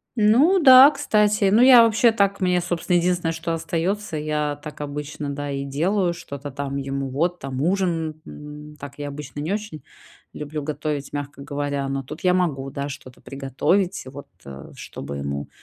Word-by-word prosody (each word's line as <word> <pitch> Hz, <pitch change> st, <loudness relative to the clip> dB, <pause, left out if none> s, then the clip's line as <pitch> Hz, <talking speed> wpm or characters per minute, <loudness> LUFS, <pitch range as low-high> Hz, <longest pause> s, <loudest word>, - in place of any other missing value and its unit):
Ну 250 Hz, -, +4 dB
да, 265 Hz, -3 st, +9 dB
кстати. 210 Hz, -7 st, +1 dB
Ну, 220 Hz, +4 st, +5 dB
я 250 Hz, -2 st, +9 dB
вообще 230 Hz, +1 st, +4 dB
так 200 Hz, -2 st, 0 dB
мне, 180 Hz, -1 st, +2 dB
собственно, 175 Hz, 0 st, 0 dB
единственное, 175 Hz, -1 st, 0 dB
что 165 Hz, +1 st, -3 dB
остаётся- 170 Hz, +3 st, -2 dB
я 150 Hz, -1 st, -2 dB
так 150 Hz, -1 st, -8 dB
обычно, 145 Hz, 0 st, -5 dB
да, 145 Hz, 0 st, -4 dB
и 140 Hz, 0 st, -3 dB
делаю: 175 Hz, +7 st, 0 dB
что-то 145 Hz, -4 st, -8 dB
там 140 Hz, 0 st, -4 dB
ему 135 Hz, 0 st, -3 dB
вот 170 Hz, +7 st, -1 dB
там 135 Hz, 0 st, -5 dB
ужин. 165 Hz, -3 st, -1 dB
Н 150 Hz, 0 st, -11 dB
так 140 Hz, 0 st, -10 dB
я 145 Hz, -, -5 dB
обычно 145 Hz, 0 st, -8 dB
не 155 Hz, +6 st, -2 dB
очень 210 Hz, -7 st, -6 dB, 0.5 s
люблю 150 Hz, 0 st, -5 dB
готовить, 145 Hz, -1 st, -4 dB
мягко 145 Hz, -1 st, -6 dB
говоря, 140 Hz, -1 st, -3 dB
но 135 Hz, 0 st, -3 dB
тут 135 Hz, -, -9 dB
я 180 Hz, -1 st, +3 dB
могу, 140 Hz, -7 st, -1 dB
да, 140 Hz, +1 st, -4 dB
что-то 130 Hz, -2 st, -10 dB
приготовить, 140 Hz, +8 st, -1 dB
вот, 140 Hz, +2 st, -10 dB, 0.2 s
э, 70 Hz, 0 st, -10 dB
чтобы 70 Hz, -, -8 dB
ему 70 Hz, 0 st, -4 dB
150 Hz, 175 wpm, -23 LUFS, 140-185 Hz, 0.5 s, да